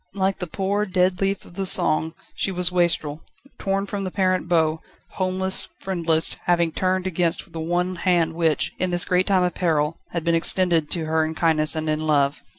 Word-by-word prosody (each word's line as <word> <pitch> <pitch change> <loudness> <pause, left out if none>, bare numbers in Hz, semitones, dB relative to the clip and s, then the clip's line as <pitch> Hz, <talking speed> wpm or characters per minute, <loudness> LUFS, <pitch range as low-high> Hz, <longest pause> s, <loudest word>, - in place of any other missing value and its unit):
Like 195 0 0
the 180 - -4
poor, 200 +4 -1
dead 185 -1 +1
leaf 195 0 -1
of - - -15
the 195 +1 -3
song, 160 -4 +3 0.2
she 195 - -2
was 180 -1 +1
wastrel, 165 -4 +1 0.4
torn 195 0 -1
from 200 0 -4
the 190 - -3
parent 185 -1 0
bough, 160 -2 +1 0.3
homeless, 190 0 -1
friendless, 165 -4 0
having 170 -2 +2
turned 185 +2 -1
against 175 -2 -1
the 165 - -7
one 175 +3 -1
hand 170 -2 +1
which, 160 -2 0
in 185 - 0
this 175 0 +2
great 180 0 +1
time 190 -3 +3
of 180 - 0
peril, 160 -2 0
had 170 -2 -4
been 170 0 +1
extended 165 -2 +2
to 165 -3 0
her 160 0 +1
in 160 0 -4
kindness 155 -2 +2
and 155 0 -3
in 155 0 0
love. 140 -1 +1
175 Hz, 195 wpm, -22 LUFS, 160-185 Hz, 0.4 s, song